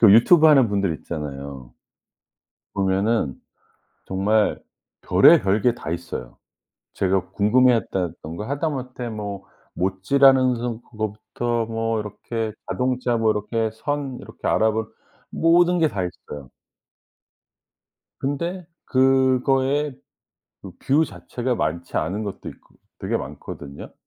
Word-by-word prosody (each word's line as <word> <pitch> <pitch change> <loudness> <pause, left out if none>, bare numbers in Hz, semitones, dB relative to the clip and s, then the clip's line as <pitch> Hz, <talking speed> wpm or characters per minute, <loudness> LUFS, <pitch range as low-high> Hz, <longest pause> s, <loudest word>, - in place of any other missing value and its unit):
그 110 -4 +8
유튜브 155 - +7
하는 135 -6 +6
분들 100 -4 0
있잖아요. 70 -5 -7 1.0
보면은 95 - 0 0.6
정말 105 +3 +1 0.4
별의별 100 +2 +5
게 120 +1 +3
다 80 -9 -6
있어요. 85 -8 -6 0.6
제가 95 -1 0
궁금해했다던가 105 -6 +1
하다못해 130 -4 -3
뭐 100 -3 -6 0.3
못질하는 130 +8 +3
서 120 -1 -4
그거부터 110 +2 -3
뭐 115 0 -1
이렇게 110 +2 -4 0.2
자동차 125 -1 0
뭐 115 -1 +2
이렇게 110 +2 -1
선 135 +3 -3
이렇게 - - -9
알아보는 110 0 +1 0.4
모든 175 +2 +4
게 160 -2 +3
다 100 -9 -3
있어요. 75 -6 -8 1.7
근데 170 +6 -3 0.2
그거에 135 +2 +2 0.7
그 95 - -9
뷰 145 +4 +2
자체가 125 -2 -4
많지 85 -2 -3
않은 95 +7 -2
것도 100 -2 -6
있거 - - -18 0.2
되게 - - -2
많거든요. 70 0 -9
110 Hz, 245 characters per minute, -23 LUFS, 95-130 Hz, 1.7 s, 그